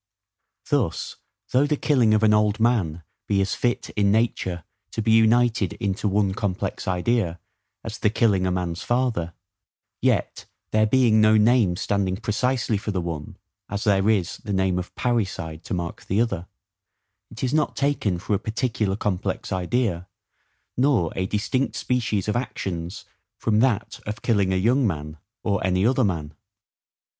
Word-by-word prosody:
Thus, - - 0 0.3
though 135 +3 +3
the 150 0 0
killing 125 -9 +3
of 110 - +1
an 105 -1 +5
old 105 0 +2
man 100 -9 +1 0.2
be 100 - +2
as 95 0 +1
fit 120 -1 -1
in 100 -1 +2
nature 100 -6 0 0.3
to - - -4
be 110 - +2
united 115 -2 +3
into 100 0 -2
one 100 -1 +1
complex 95 -2 -3
idea, 90 -1 0 0.4
as 110 0 -6
the 105 - +3
killing 100 -4 +2
a - - 0
man's 90 0 -2
father; 120 -10 0 0.7
yet, - - 0 0.3
there 110 0 +3
being 115 -2 +4
no 110 0 +5
name 110 -4 +4
standing 95 0 -1
precisely 110 +1 0
for 105 - -5
the 95 -3 -1
one, 85 -4 -5 0.3
as 105 +1 -3
there 100 -1 +3
is 95 -5 +1
the 105 -3 -5
name 95 -1 +1
of 90 - -8
PARRICIDE 95 -9 -2
to - - -4
mark 85 -1 -5
the 95 - 0
other, 95 -7 -1 0.8
it 110 - -9
is 130 +1 0
not 155 -1 +1
taken 140 -10 0
for 100 +4 -3
a 100 - +2
particular 110 -3 -1
complex 100 -2 -2
idea, 90 -1 -1 0.7
nor 125 - +2
a 95 0 -1
distinct 115 +7 -1
species 115 -6 -1
of 105 - 0
actions 95 -7 -4 0.3
from 110 -1 +1
that 115 -3 +1
of 105 +1 -5
killing 100 -5 +2
a - - +1
young 120 +6 +3
man, 75 -3 -4 0.2
or 100 -3 0
any 95 +1 +2
other 130 +2 +3
man. 80 -7 -2
105 Hz, 160 wpm, -24 LUFS, 95-115 Hz, 0.8 s, an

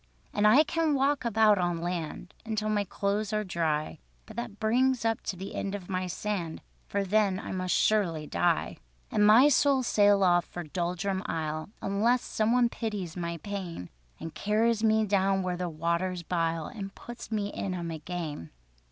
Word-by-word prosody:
"And 210 0 +3
I 260 +9 +7
can 320 -2 0
walk 275 +1 +1
about 215 -3 +4
on 175 -2 0
land 175 0 -4
Until 215 -1 -2
my 210 -1 +1
clothes 200 +2 -2
are 215 0 +1
dry, 160 -5 -1 0.3
But - - -12
that 235 -3 -6
brings 245 +2 +2
up 225 -1 +1
to 195 - -4
the 190 +2 -7
end 200 0 -3
of 195 -1 -8
my 185 0 -1
sand, 180 -3 -4 0.2
For 200 0 -1
then 200 -1 +2
I - - -6
must 185 -1 -1
surely 175 -8 +2
die: 170 +2 0 0.3
"And 210 - +2
my 235 +7 +8
soul 280 -2 +3
sail 205 -4 +4
off 175 -2 +4
for 175 - -7
Doldrum 180 +4 -2
Isle, 155 +1 -3
Unless 225 +5 +2
some 220 +1 0
one 245 0 +4
pities 210 -8 -4
my 170 -1 -3
pain, 185 - -5 0.3
And 165 - -7
carries 220 +2 +1
me 220 0 +3
down 195 -1 +2
where 180 -1 -1
the 180 0 -3
waters 170 +3 -1
bile, 165 -2 -1
And 200 -4 -7
puts 240 -1 -10
me 205 -2 -1
in 190 -2 -3
'em 170 -2 -4
again. 160 - -5
195 Hz, 180 wpm, -29 LUFS, 175-215 Hz, 0.3 s, my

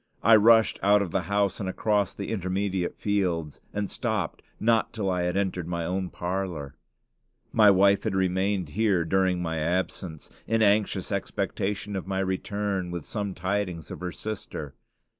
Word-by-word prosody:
I 115 +1 +8
rushed 110 +1 +5
out 100 +1 +5
of 90 - -6
the 95 - +1
house 100 -1 +1
and 95 -3 -2
across 105 +1 0
the 100 - -5
intermediate 95 -2 -1
fields, 90 -7 -1
and 105 -1 -2
stopped - - -2 0.2
not 115 0 +2
till 100 -4 -1
I 90 -1 0
entered 90 -1 -1
my 85 -1 -2
own 95 +1 -2
parlor. 90 -7 -3 0.8
My 105 -2 +6
wife 100 +1 +5
had 110 -4 -2
remained 95 -1 0
here 95 -1 +1
during 90 0 +1
my 80 -1 -2
absence, 85 -1 -2 0.2
in 115 0 +2
anxious 105 0 +2
expectation 100 +1 -2
of 95 -1 -4
my 95 -1 -2
return 95 0 -1
with 85 -3 -5
some 100 -3 -3
tidings 90 -3 -2
of - - -6
her 90 0 -4
sister. 100 -10 -6
95 Hz, 160 wpm, -27 LUFS, 90-105 Hz, 0.8 s, I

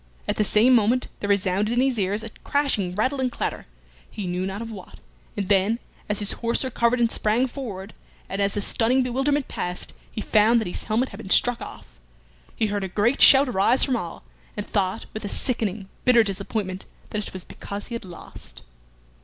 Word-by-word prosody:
At - - -1
the - - +3
same 220 +5 +4
moment 240 +2 +3
there 205 - -3
resounded 200 +1 +1
in - - +2
his 260 -3 +1
ears 200 +3 0
a 225 - -7
crashing 220 -11 0
rattle 260 +6 0
and 255 -1 0
clatter, - - -3 0.4
he 205 - -6
knew 180 +1 -2
not 195 +1 -4
of 230 0 -6
what, 195 -4 -10 0.4
and 200 -2 -2
then, 200 +3 +3 0.3
as 210 - 0
his 205 -1 +2
horse 235 +2 0
recovered 240 -1 +1
and 230 -1 +2
sprang 220 +4 +2
forward, 220 -7 -7 0.3
and 195 - -3
as 200 0 +1
the 205 - 0
stunning 245 +5 +3
bewilderment 270 +3 0
passed, 180 0 -3 0.2
he - - -6
found 220 +2 +4
that 220 - -2
his 175 - -4
helmet 230 +5 0
had - - -11
been 190 - -8
struck 245 +4 +3
off. - - -11 0.6
He 220 - +1
heard 205 -1 -2
a - - -2
great 210 +8 +1
shout 275 +1 +8
arise 240 +3 +3
from 265 - +2
all, 175 - -5 0.3
and 205 - -3
thought, 195 +1 -1
with 215 - -6
a 205 - -3
sickening, 215 -6 -1 0.2
bitter 240 -2 +6
disappointment, 195 -1 -3 0.3
that 210 -1 -3
it - - -9
was 185 -2 -7
because 200 +3 -8
he - - -7
had 235 - -4
lost. 175 - -11
215 Hz, 205 wpm, -24 LUFS, 195-245 Hz, 0.6 s, shout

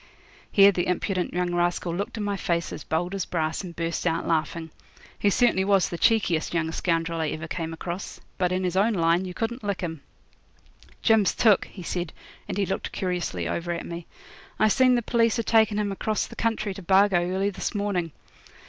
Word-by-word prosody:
Here 200 0 +7
the 180 -1 -1
impudent 180 0 -1
young 175 0 -1
rascal 175 0 0
looked 200 +4 -4
in 215 - -2
my 205 -1 -1
face 170 -3 -1
as - - -7
bold 175 +4 -1
as 195 -2 -1
brass 160 +1 -2
and 175 -2 -8
burst 170 +1 -2
out 165 0 0
laughing. 160 0 -1 0.5
He 205 - +3
certainly 215 -3 +3
was 195 -1 +3
the 170 - -4
cheekiest 175 -8 +2
young 160 -1 0
scoundrel 165 -1 -1
I 160 - 0
ever 155 +2 -4
came 165 -1 -4
across. 170 +3 -6 0.2
But 180 -1 +2
in 185 +1 0
his 180 -1 -1
own 210 +4 +3
line 170 0 +2
you 180 -1 -7
couldn't 235 +2 -3
lick 200 -2 -2
him. 165 -4 -4 1.0
'Jim's 220 -4 +4
took,' 215 -4 +4
he 185 - -11
said, 175 -1 -3 0.3
and - - -4
he 200 - +2
looked 190 - -3
curiously 175 - -2
over 170 - -2
at 170 - -5
me. 170 0 -7 0.5
'I 215 - +4
seen 255 +3 +4
the 240 - 0
p'leece 230 0 +2
a 230 - 0
takin' 220 -2 +3
him 210 -1 0
across 215 +2 -1
the - - -11
country 220 -3 -1
to 195 - -9
Bargo 190 0 +4
early 190 +3 0
this 190 +2 -4
morning. 195 -5 -1
180 Hz, 200 wpm, -26 LUFS, 170-205 Hz, 1.0 s, Here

